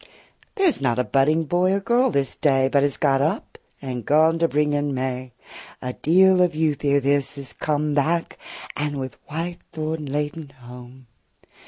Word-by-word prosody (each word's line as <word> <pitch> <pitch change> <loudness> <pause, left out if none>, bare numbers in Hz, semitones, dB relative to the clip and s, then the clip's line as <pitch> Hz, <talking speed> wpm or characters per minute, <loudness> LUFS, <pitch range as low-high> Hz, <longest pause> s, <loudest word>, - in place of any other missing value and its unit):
There 390 -3 +1
's - - -4
not 125 -3 +1
a 125 - +2
budding 150 +5 +2
boy 175 +4 +1
or 200 - +1
girl 240 +5 +2
this 140 - -1
day 135 -3 +2
But 140 0 +2
is 145 -1 +1
got 135 -2 +2
up 155 +3 -2 0.2
and 125 -3 -5
gone 160 +5 +3
to 165 - +3
bring 150 -1 0
in 145 -1 -1
May. 130 0 -3 0.5
A 125 -1 -5
deal 185 +5 +4
of 180 -3 +2
youth 155 -3 0
ere 140 0 +3
this 140 +1 0
is 140 -2 -5
come 150 -1 -1
45 - - -2
Back, 165 +4 0 0.4
and 145 -1 -2
with 130 -1 -6
white 170 +3 -4
thorn 155 -1 -4
laden 150 +2 -3
home. 125 +1 -12
145 Hz, 185 wpm, -23 LUFS, 135-160 Hz, 0.5 s, deal